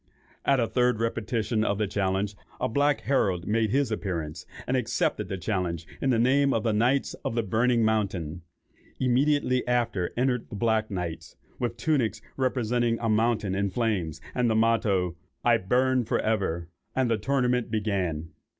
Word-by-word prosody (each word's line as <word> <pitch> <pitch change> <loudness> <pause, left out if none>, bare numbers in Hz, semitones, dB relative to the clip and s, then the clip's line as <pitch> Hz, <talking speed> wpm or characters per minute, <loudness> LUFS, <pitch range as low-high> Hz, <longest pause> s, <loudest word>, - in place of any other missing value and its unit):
At 140 - +4
the 120 -3 +2
third 125 -1 +1
repetition 115 -1 -1
of 100 -2 0
the 105 - +1
challenge, 100 +1 -1 0.2
a - - +1
black 145 +4 +2
herald 95 -10 +1
made 110 0 +1
his 135 +1 +1
appearance, 85 -8 -4 0.2
and 130 - 0
accepted 130 +6 0
the 95 - -3
challenge 90 -4 -2 0.2
in 135 - +1
the 125 - +3
name 135 +4 +3
of 110 - 0
the 115 -2 +1
"Knights 125 +6 +2
of - - -2
the 115 - +1
Burning 115 +3 +2
Mountain." 95 -7 -1 0.6
Immediately 130 0 +2
after 115 -7 0
entered 125 -1 0
the - - -7
black 110 0 +1
knights, 90 -5 -5 0.2
with 120 -1 -2
tunics 120 -4 +1 0.2
representing 120 -2 +1
a 115 - -1
mountain 110 -2 +1
in 100 +1 0
flames, 95 -8 -1
and 125 -2 +1
the 110 - +2
motto, 105 -6 +2 0.3
"I 120 -1 +5
burn 125 +5 +2
for - - 0
ever;" 95 -6 -1 0.3
and 130 -1 +2
the 115 -1 +1
tournament 125 0 +1
began. 95 -8 -1
110 Hz, 165 wpm, -27 LUFS, 100-125 Hz, 0.6 s, I